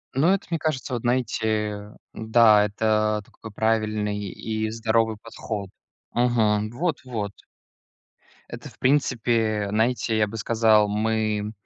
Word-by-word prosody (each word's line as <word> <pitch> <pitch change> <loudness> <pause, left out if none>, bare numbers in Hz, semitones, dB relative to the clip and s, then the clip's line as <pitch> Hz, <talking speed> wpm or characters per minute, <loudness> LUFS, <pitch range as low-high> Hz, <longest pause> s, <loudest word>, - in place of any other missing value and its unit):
Ну, 155 +7 +3
это 195 0 +1
мне 165 - 0
кажется, 135 -5 -2
вот, 120 - -2
знаете, 110 -4 -1 0.2
да, 110 -2 +4
это 105 0 0
такой 110 - -12
правильный 110 -1 0
и 110 +3 -3
здоровый 110 -1 0
подход. 105 -3 -6 0.4
Мгм. 110 -3 +1
Вот-вот. 125 - -3 1.2
Это - - -8
в - - -22
принципе, 115 -6 +1
знаете, 110 +1 0
я 105 -1 +2
бы 115 - -8
сказал, 110 -1 +3
мы 110 0 -1
110 Hz, 120 wpm, -24 LUFS, 105-120 Hz, 1.2 s, да